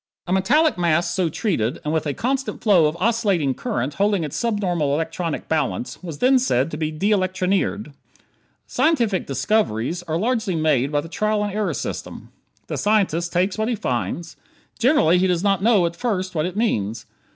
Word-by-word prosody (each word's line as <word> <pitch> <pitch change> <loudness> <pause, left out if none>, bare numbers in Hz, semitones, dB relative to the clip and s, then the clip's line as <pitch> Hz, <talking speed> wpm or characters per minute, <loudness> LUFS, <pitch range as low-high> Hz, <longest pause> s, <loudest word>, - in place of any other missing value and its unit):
A 180 - -1
metallic 250 - +3
mass 170 0 +2
so 185 -4 0
treated 155 - -1
and 150 - -1
with 160 -1 0
a 145 - -2
constant 270 +2 -2
flow 185 -8 +5
of 155 +2 -3
oscillating 200 - +1
current 130 +3 -3
holding 200 +1 +1
its 150 - -5
subnormal 185 -10 0
electronic 165 +1 -3
balance 150 -5 -2
was 165 -5 -7
then 260 - +4
said 165 - +1
to - - -4
be 155 -1 -1
de 185 +7 -1
electronired. 185 -2 0 0.7
Scientific 235 - +1
"discoveries" 160 - 0
are 160 0 -1
largely 220 -2 0
made 150 -4 +1
by 145 -1 +1
the 160 - -9
trial 215 +4 0
and 205 - -4
error 210 0 -1
system. - - -6 0.4
The - - -4
scientist 185 -5 +1
takes 185 +4 0
what 220 +2 0
he 240 - 0
finds. 130 - -3 0.4
Generally 225 - +4
he 190 - +2
does 180 -1 0
not 195 -2 +2
know, 210 -4 +4
at 170 0 -2
first, 190 -3 -2
what 155 0 0
it 185 +2 -7
means. 115 - -1
180 Hz, 180 wpm, -22 LUFS, 155-215 Hz, 0.7 s, flow